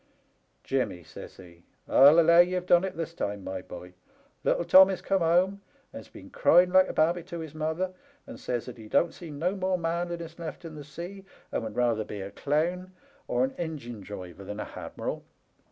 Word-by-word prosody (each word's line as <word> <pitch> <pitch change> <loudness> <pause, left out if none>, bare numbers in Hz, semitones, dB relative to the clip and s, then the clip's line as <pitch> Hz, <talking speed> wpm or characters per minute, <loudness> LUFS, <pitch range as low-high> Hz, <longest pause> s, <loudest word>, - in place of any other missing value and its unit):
Jimmy,' 110 -10 -2
says - - -11
he, 85 -2 -15
' - - -42
I 135 +2 +8
allow 170 +2 +6
ye*ve 180 +1 +3
done 175 0 +5
it 190 - -4
this 165 0 -4
time, 100 - -4
my 95 0 -5
boy. 90 0 -11 0.5
Little 170 - +1
Tommy's 190 +2 +7
come 195 - 0
home 180 +4 +2 0.3
and's - - -9
been - - -13
a - - -13
crying 180 - +5
like 185 0 +6
a - - -4
babby 170 +3 +2
to 175 -2 -7
his 160 -3 -7
mother, 160 +4 -2 0.3
and 270 -1 -10
says 120 - -3
that 125 -2 -10
he 110 - -10
don't 165 +9 +2
see 170 - -10
no 165 +6 -2
more 185 -1 0
manliness 170 0 -3
left 170 +1 -7
in 165 - -8
the 150 -1 -8
sea, 175 +7 -9 0.3
and - - -1
would 110 -2 -6
rather 120 -3 +1
be 105 - -7
a 100 +1 -7
clown 175 - -1 0.3
or - - +1
an 265 +1 -1
engine 140 -10 -5
driver 95 -2 -9
than 105 +2 -7
a - - -3
hadmiral.' - - -6
165 Hz, 200 wpm, -28 LUFS, 120-180 Hz, 0.5 s, I